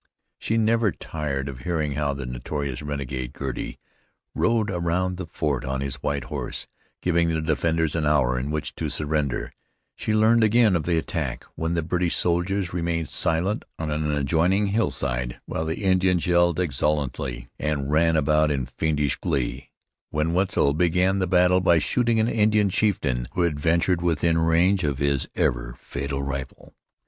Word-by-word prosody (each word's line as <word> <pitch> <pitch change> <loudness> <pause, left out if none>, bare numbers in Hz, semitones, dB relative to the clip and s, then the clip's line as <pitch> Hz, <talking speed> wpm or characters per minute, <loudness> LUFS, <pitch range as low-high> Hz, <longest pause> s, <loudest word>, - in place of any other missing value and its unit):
She 115 - 0
never 115 -1 +3
tired 70 -4 -4
of 65 -3 -6
hearing 75 +1 -1
how 70 0 -1
the 70 -1 -5
notorious 65 +2 -4
renegade, 70 -3 -4
Girty, 65 -4 -5 0.6
rode 110 -3 +1
around 90 +1 -1
the 90 -2 -5
fort 75 -4 -2
on 65 +1 -2
his 70 -1 -4
white 70 -1 -1
horse, - - -4 0.4
giving 85 -1 +2
the 80 -1 0
defenders 80 0 0
an 80 -2 0
hour 65 -4 +2
in 65 +3 -3
which 75 0 -3
to 80 - -2
surrender; 75 -2 -1 0.4
she 110 - -1
learned 110 +2 +4
again 110 -2 +4
of 80 -3 -1
the 85 -2 +1
attack, 80 - -3
when 80 +1 -2
the 85 - 0
British 85 +1 0
soldiers 90 +2 0
remained 85 -2 -1
silent 90 +7 0
on 80 -1 -3
an 75 0 -1
adjoining 85 +8 +2
hillside, 65 - -1
while 80 - -3
the 80 +6 -3
Indians 95 -2 +2
yelled 85 -1 +3
exultantly 70 -5 -1
and 75 -2 -1
ran 80 +1 +3
about 75 0 +3
in 70 -3 -1
fiendish 75 +3 -1
glee, 60 0 -2 0.4
when 75 +2 0
Wetzel 90 -6 +2
began 90 +4 +2
the 95 - 0
battle 90 +1 +4
by 85 -2 +4
shooting 115 +6 +1
an 110 - +2
Indian 105 -2 +3
chieftain 70 - 0
who 90 - 0
had 80 -4 0
ventured 85 +3 +2
within 85 -1 +2
range 85 +4 +3
of 70 -3 0
his 70 -1 0
ever - - 0
fatal 70 -1 -4
rifle. 70 -2 -6
80 Hz, 165 wpm, -24 LUFS, 70-90 Hz, 0.6 s, learned